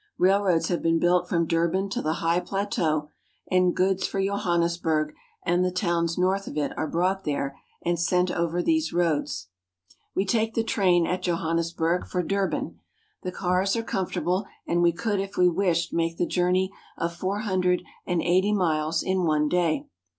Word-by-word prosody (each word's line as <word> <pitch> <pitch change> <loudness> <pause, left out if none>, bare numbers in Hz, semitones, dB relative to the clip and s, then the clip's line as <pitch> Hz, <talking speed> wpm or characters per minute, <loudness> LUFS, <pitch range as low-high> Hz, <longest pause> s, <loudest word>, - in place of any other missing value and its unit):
Railroads 190 -2 +3
have 175 - 0
been 165 0 +2
built 175 +1 +2
from 170 -1 +2
Durban 170 +4 +1
to - - -2
the 155 - 0
high 170 +1 +3
plateau, 170 -5 -1 0.4
and 180 -1 +3
goods 190 0 +1
for 195 - -3
Johannesburg 170 -5 0 0.3
and 175 +1 +2
the 180 - +2
towns 170 -2 0
north 190 +2 +1
of - - -6
it 150 - -1
are 155 - -2
brought 185 +3 0
there 140 -2 -2 0.3
and 175 -1 +1
sent 180 +1 +2
over 170 +1 -1
these 320 -1 +1
roads. 150 - -1 0.7
We 190 - +1
take 225 +2 0
the 230 - +2
train 180 -6 +3
at 180 +2 -1
Johannesburg 170 0 0
for 180 -1 -1
Durban. 195 +2 -2 0.4
The 185 - -4
cars 185 +2 +1
are 230 - -1
comfortable, 190 -1 -1 0.2
and 175 +1 +1
we 170 0 +5
could 205 +4 -1
if 195 +1 -5
we 180 - +5
wished 175 -1 +1
make 165 0 0
the 175 - +1
journey 180 +2 +1 0.3
of 170 0 -2
four 190 +4 -2
hundred 185 -4 +1 0.2
ana 175 -2 0
eighty 185 +4 +3
miles 160 -4 +1
in 190 -1 0
one 155 -2 +2
day. 170 -2 +1
180 Hz, 170 wpm, -26 LUFS, 170-190 Hz, 0.7 s, we